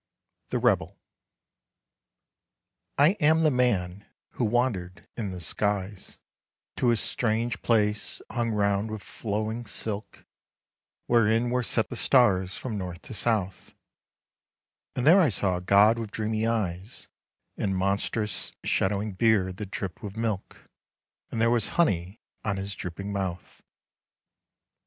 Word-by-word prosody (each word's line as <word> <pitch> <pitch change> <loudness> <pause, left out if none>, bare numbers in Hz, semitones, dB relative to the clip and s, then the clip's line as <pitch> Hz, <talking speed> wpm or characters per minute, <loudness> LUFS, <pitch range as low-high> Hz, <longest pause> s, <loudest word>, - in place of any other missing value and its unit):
THE - - 0
REBEL - - +1 2.0
I 145 +3 +6
AM 160 +2 +4
the 155 -2 +4
man 100 -7 0 0.2
who 120 - -1
wandered 105 -5 -1
in 110 -4 -3
the 90 -1 -6
skies, 100 +3 -2 0.6
To 125 - +2
a 120 - +4
strange 115 +1 0
place 105 -2 +1
hung 120 -2 -1
round 100 0 +1
with 110 -2 -6
flowing 110 +2 -4
silk 105 0 -4 0.8
Wherein 115 +1 +3
were 125 0 +1
set 115 -1 0
the - - -5
stars 95 -8 +3
from 110 -5 -4
north 90 -2 -6
to - - -9
south; 105 -4 -1 1.2
And 125 - -1
there 170 +6 +8
I 160 - +4
saw 95 -3 +1
a - - -6
god 100 +5 +5
with 115 -2 -4
dreamy 110 +1 -1
eyes, 100 -2 -3 0.5
And 95 -2 -1
monstrous 100 +3 -1
shadowing 100 +2 +1
beard 95 -3 +2
that 105 -2 -6
dripped 95 -2 -5
with 105 0 -7
milk, 110 -4 -4 0.6
And 115 - -4
there 115 +1 +3
was 120 -3 +2
honey 95 - +1 0.2
on 100 -2 -1
his 100 +1 -4
drooping 95 +3 -6
mouth. 95 -3 -5
105 Hz, 130 wpm, -27 LUFS, 95-115 Hz, 2.0 s, there